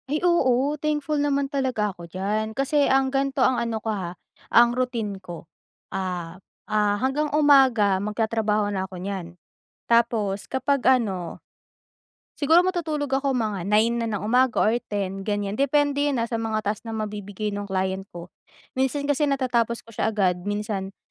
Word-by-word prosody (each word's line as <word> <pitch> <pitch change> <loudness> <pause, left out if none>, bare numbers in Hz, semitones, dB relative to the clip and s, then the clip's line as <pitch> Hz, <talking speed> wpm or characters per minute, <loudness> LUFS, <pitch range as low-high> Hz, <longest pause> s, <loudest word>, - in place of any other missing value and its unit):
Ay, 300 - +1
oo 275 -5 +3
thankful 300 -1 0
naman 280 -1 +1
talaga 260 -7 -1
ako 170 -1 -11
diyan 210 +4 -2
kasi 280 +1 +2
ang 265 0 +2
gan'to 270 -1 +1
ang 250 -2 +2
ano 230 -1 -2
ko, 220 +1 -5
ha, 185 -4 -4 0.4
ang 240 0 +5
routine 230 -6 -2
ko, 175 -3 -9 0.5
ah, 180 -1 -4 0.2
ah, 210 -1 +1
hanggang 270 +5 0
umaga 260 -10 +5
magtatrabaho 210 0 0
na 190 -1 -3
ako 185 - -9
nyan 180 -2 -6 0.5
tapos 225 -4 +1
kapag 265 +1 0 0.2
ano 185 -6 -4 1.0
siguro 315 +4 +5
matutulog 320 -5 -1
ako 270 +1 +1
mga 215 -6 -1
9 220 +3 +3
na - - -1
ng - - -8
umaga 250 +2 +2
or 215 - +3 0.2
10 195 -2 -3
ganyan. 205 -1 -2
Depende 285 +1 +2
yan, 275 - -1
ah, 230 - +1
sa 230 -1 -2
mga 220 -1 -2
task 205 +1 -1
na - - -4
mabibigay 210 -1 -4
ng 205 0 -4
client 190 0 -2
ko, 170 0 -9 0.5
minsan 265 +2 0
kasi 290 +1 +1
natatapos 240 -4 0
ko 230 - -16
siya 220 - -1
agad, 185 -4 +1
minsan 205 -2 -3
225 Hz, 160 wpm, -24 LUFS, 200-270 Hz, 1.0 s, ang